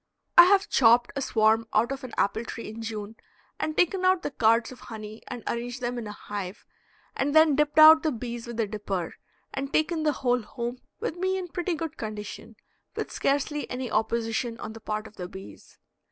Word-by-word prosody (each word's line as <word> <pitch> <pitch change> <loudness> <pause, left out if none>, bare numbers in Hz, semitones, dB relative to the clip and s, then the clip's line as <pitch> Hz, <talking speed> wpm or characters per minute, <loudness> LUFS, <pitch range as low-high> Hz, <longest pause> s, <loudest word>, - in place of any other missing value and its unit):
I 345 - +11
have 395 +2 +4
chopped 240 - +4
a 275 - -2
swarm 225 -2 +2
out 230 +4 +3
of 275 0 -5
an 255 - -8
apple 220 +3 +1
tree 230 - -7
in 220 +1 -8
June 220 -1 -6 0.4
and 310 - -2
taken 365 +1 +2
out 370 -1 +3
the - - -3
cards 230 -1 +2
of 255 - -11
honey 215 -2 -9
and 240 - -7
arranged 240 +2 -3
them 245 -1 -3
in 225 - -6
a - - -5
hive, 205 -1 -7 0.5
and 285 +2 -1
then 315 -2 +6
dipped 300 +1 +1
out 315 +1 +10
the 315 - 0
bees 240 -1 -6
with 235 -1 -6
a 225 - +2
dipper, 200 -4 -4 0.4
and 275 +1 -4
taken 315 +1 +1
the 305 -1 +2
whole 245 -1 +1
home 240 +3 -5 0.2
with 330 - -3
me 375 +1 0
in 365 -2 -5
pretty 355 0 -2
good 320 0 -5
condition, 215 -1 -7 0.4
with - - -4
scarcely 290 +1 -1
any 250 -2 -4
opposition 225 +1 -1
on 220 - -6
the 225 - -10
part 215 0 -3
of 220 - -14
the 180 - -5
bees. 190 +1 -12
240 Hz, 205 wpm, -27 LUFS, 220-300 Hz, 0.5 s, I